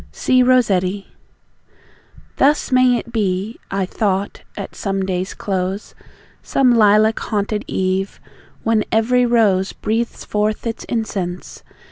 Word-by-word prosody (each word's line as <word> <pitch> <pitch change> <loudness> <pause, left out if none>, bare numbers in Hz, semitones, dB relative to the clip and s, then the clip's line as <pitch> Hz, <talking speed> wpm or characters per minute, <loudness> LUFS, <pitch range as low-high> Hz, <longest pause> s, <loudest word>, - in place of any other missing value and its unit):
C. 255 -1 +2
ROSSETTI. 205 -7 +2 1.3
Thus 290 +1 +2
may 255 -1 +4
it 235 - -7
be 205 0 -1
(I 195 -1 -1
thought) 195 0 -2 0.2
at - - -6
some 195 -1 -2
day's 185 0 -3
close, 190 +1 -3 0.5
Some 255 -3 +2
lilac 215 0 +4
haunted 210 0 -2
eve, 190 +1 -1 0.4
when 225 -1 +2
every 245 +3 +3
rose 205 -5 +2
Breathes 230 +2 -3
forth 210 +2 -1
its 230 -1 -4
incense. 190 -6 -4
210 Hz, 115 wpm, -19 LUFS, 190-235 Hz, 1.3 s, may